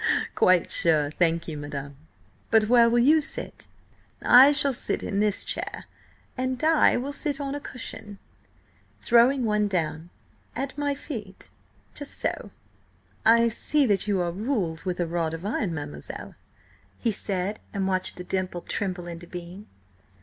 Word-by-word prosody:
"Quite 185 -2 +3
sure, 150 -3 +2
thank 165 0 0
you, 155 -3 -5
madam. 140 -1 -7 0.5
But 220 -1 +4
where 235 0 +5
will 235 - +2
you 295 +6 +5
sit?" - - -4 0.6
"I 260 +3 +8
shall 285 -1 +6
sit 240 - -2
in 200 - -2
this 210 -1 +1
chair, - - -4 0.5
and 255 0 -2
Di 315 +2 +3
will 270 +4 -4
sit 290 -1 0
on 280 -1 -3
a 290 - -4
cushion"–throwing 235 +2 -2
one 210 -1 +1
down–"at 175 - -5
my 285 -1 -1
feet–so." 260 - -7 0.8
"I 230 +1 +6
see 280 +5 +1
that 205 -3 +1
you 200 -3 +1
are - - 0
all 170 - -2
ruled 190 -5 -3
with 180 -1 -3
a 175 - +1
rod 165 -1 -2
of 165 +4 -9
iron, 205 -3 -1
mademoiselle," 145 -2 -7 0.6
he 230 - 0
said, 200 0 -3
and 195 -2 -2
watched 185 -1 0
the 180 - -8
dimple 185 -1 -3
tremble 185 -2 -3
into 170 0 -8
being. 180 +3 -9
205 Hz, 145 wpm, -25 LUFS, 175-250 Hz, 0.8 s, I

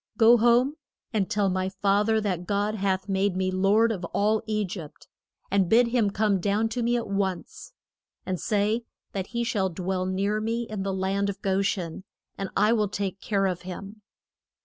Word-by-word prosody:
Go 235 +1 +7
home 240 +6 +3 0.4
and 200 -4 0
tell 210 -3 +1
my 185 0 0
fath 200 +2 +1
er 220 0 +3
that 180 -4 -2
God 205 +1 0
hath 190 -2 -1
made 195 -1 +1
me 185 0 0
lord 200 +5 +3
of 190 -5 -4
all 210 +4 +1
E 215 -1 0
gypt, 165 -5 -9 0.4
and 195 -3 +2
bid 235 +1 +5
him 230 -4 +2
come 200 -1 +1
down 205 +4 +1
to 240 +2 -3
me 240 +1 +2
at 235 - -3
once. 195 -3 -3 0.5
And 185 -2 -2
say 210 +2 +1 0.3
that 190 -2 -3
he 235 0 -2
shall 205 -5 0
dwell 185 +1 -2
near 200 +3 0
me, 230 +2 -1
in 215 -3 -5
the 195 0 -2
land 195 +1 0
of 200 0 -5
Go 195 0 +1
shen, 185 -3 -2 0.3
and 195 -1 -4
I 210 +3 +4
will 210 -3 +1
take 195 -1 -3
care 200 -2 0
of 180 -2 -1
him. 195 +4 -8
200 Hz, 195 wpm, -26 LUFS, 190-215 Hz, 0.5 s, Go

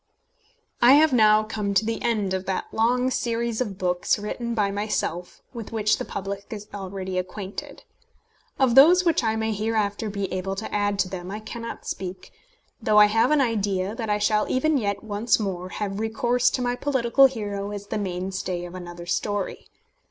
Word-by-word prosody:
I 245 +2 +8
have 300 0 +5
now 215 -2 +5
come 210 -2 -3
to 215 - +3
the 225 0 -2
end 210 -5 0
of 190 0 -3
that 190 - -1
long 250 +3 +2
series 235 -1 -1
of 205 -6 -3
books 180 -1 +1
written 235 +3 -4
by 205 -3 +1
myself, 200 -4 -3
with 230 -4 -7
which 215 -2 +1
the - - -3
public 200 +1 -5
is 210 -1 -7
already 190 -2 -4
acquainted. 190 +2 -7 0.7
Of 260 -3 +3
those 340 +8 +7
which 330 -6 +2
I 220 -1 +1
may 220 0 -1
hereafter 215 0 -1
be 200 -1 -3
able 190 +1 -2
to 215 - -6
add 205 -1 0
to 190 - -1
them 180 -1 -6
I 210 +2 -5
cannot 230 +1 -7
speak; 185 0 -6 0.5
though 215 -1 +2
I 210 - +9
have 225 - +4
an 300 -2 +4
idea 205 -5 0
that 225 -1 -4
I 210 - +2
shall 210 0 +1
even 290 +2 +2
yet 200 -3 -2
once 220 +2 +1
more 185 -3 -3
have 200 +1 -4
recourse 240 +2 +1
to 255 - -2
my 245 0 0
political 265 0 +4
hero 205 -5 -4
as 205 -1 -6
the 210 - -3
mainstay 185 -1 -3
of 175 - -9
another 175 -1 -8
story. 205 +2 -2
210 Hz, 185 wpm, -24 LUFS, 195-230 Hz, 0.7 s, I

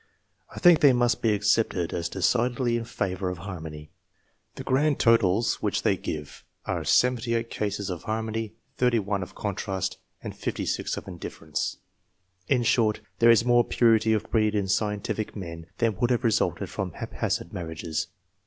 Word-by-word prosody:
I - - -14
think 175 -3 +6
they 140 -3 +6
must 120 -2 +2
be 115 - +3
accepted 105 -4 +1
as 85 0 -2
decidedly 120 +6 +1
in 115 -1 -2
favour 95 -4 -2
of 90 - -5
harmony. 80 -5 -8 0.6
The - - -7
grand 145 +2 +2
totals 115 -2 +3
which - - -1
they - - +3
give 75 -2 -6 0.2
are - - -2
78 115 -2 +2
cases 100 -2 -2
of 85 -3 -5
harmony, 110 0 -3 0.2
31 105 -5 +1
of 90 - -8
contrast, 95 -2 -3 0.2
and - - -6
56 - - -2
of - - -7
indifference. 80 -4 -4 0.7
In 125 -3 +2
short, 110 -2 +2 0.2
there 115 - +6
is 115 0 +5
more 120 0 +5
purity 115 -2 +3
of 110 - -1
breed 110 -2 +2
in 100 -2 0
scientific 105 +1 -1
men 85 -4 -7
than 115 -3 +1
would 120 - +1
have 125 0 +1
resulted 115 -3 0
from - - -4
haphazard - - -3
marriages. 80 -2 -4
110 Hz, 155 wpm, -26 LUFS, 95-115 Hz, 0.7 s, think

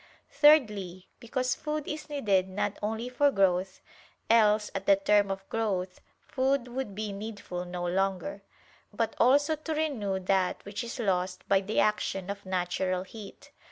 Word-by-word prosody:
Thirdly, 210 - +3
because 255 +1 -1
food 300 -1 -4
is 305 +1 -5
needed 200 -10 +1
not 205 +2 -2
only 220 +3 -2
for 270 +3 +3
growth, 190 -4 +1 0.5
else 215 -2 +4
at 195 0 -5
the 200 - +7
term 205 +1 +3
of 195 0 -5
growth, 190 -5 -2 0.2
food 265 -1 0
would 245 -5 -4
be 215 0 -3
needful 200 -4 -6
no 175 0 -4
longer; 190 +1 -1 0.5
but 225 +2 -2
also 285 +5 +4
to 310 +1 -4
renew 235 -12 -1
that 185 0 0
which 205 +2 -5
is 235 +2 -6
lost 185 -5 -1
by 195 -1 +4
the 210 +3 -1
action 200 -2 0
of 200 -1 -9
natural 185 0 -1
heat. 210 +2 -12
205 Hz, 155 wpm, -29 LUFS, 190-245 Hz, 0.5 s, the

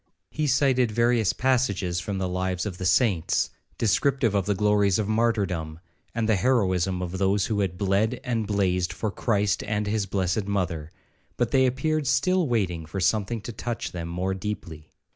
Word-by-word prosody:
—He 155 -1 -1
cited 130 -2 +3
various 115 -2 +2
passages 100 -9 0
from 95 +3 -4
the 95 -1 -1
lives 90 +1 -2
of 95 -4 -5
the 95 - 0
saints, 90 -3 +2 0.3
descriptive 115 +1 +2
of 100 -1 0
the 105 - +1
glories 105 -1 +3
of 105 -2 -1
martyrdom, 100 -8 0 0.4
and 115 -2 0
the 110 -3 +3
heroism 95 -5 +1
of 90 +1 -4
those 100 0 +2
who 110 -3 -1
had 95 -3 -1
bled 100 +5 +1
and 115 -5 -1
blazed 90 -3 0
for 110 - -3
Christ 105 -2 0
and 105 0 -1
his 105 -1 -1
blessed 95 +1 -1
mother, 90 -6 -2 0.5
but 120 -2 0
they 130 -1 +4
appeared 150 +3 -1
still 185 +4 +2
waiting 90 -9 -1
for 90 +5 -4
something 105 +4 0
to 120 - -6
touch 120 +2 -4
them 85 -2 -5
more 90 +3 -2
deeply. 85 -6 -6
100 Hz, 175 wpm, -25 LUFS, 90-115 Hz, 0.5 s, they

